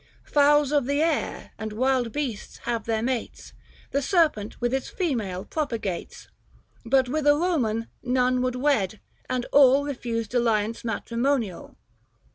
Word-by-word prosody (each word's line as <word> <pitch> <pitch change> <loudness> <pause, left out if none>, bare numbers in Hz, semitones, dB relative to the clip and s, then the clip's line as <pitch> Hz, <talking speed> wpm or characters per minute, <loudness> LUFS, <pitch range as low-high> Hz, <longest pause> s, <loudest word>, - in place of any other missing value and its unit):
Fowls 295 -1 +4
of 285 -4 +2
the 285 +1 +1
air 330 -1 -1
and 220 -1 -4
wild 255 0 +1
beasts 250 -6 -4
have 230 -3 -2
their 225 -1 -1
mates, 250 -1 -4 0.4
The 280 - +1
serpent 300 - +1
with 240 +1 0
its 265 -1 -1
female 220 - -2
propagates; 230 - -4 0.6
But 260 +2 +3
with 295 +3 -1
a 290 - +8
Koman 245 -11 0 0.2
none 250 0 +1
would 255 0 -1
wed, 250 -7 +1 0.3
and 255 -1 -1
all 280 0 +6
Kefused 235 -5 -3
alliance 230 -2 +1
matrimonial. 235 -2 -2
250 Hz, 135 wpm, -25 LUFS, 230-285 Hz, 0.6 s, a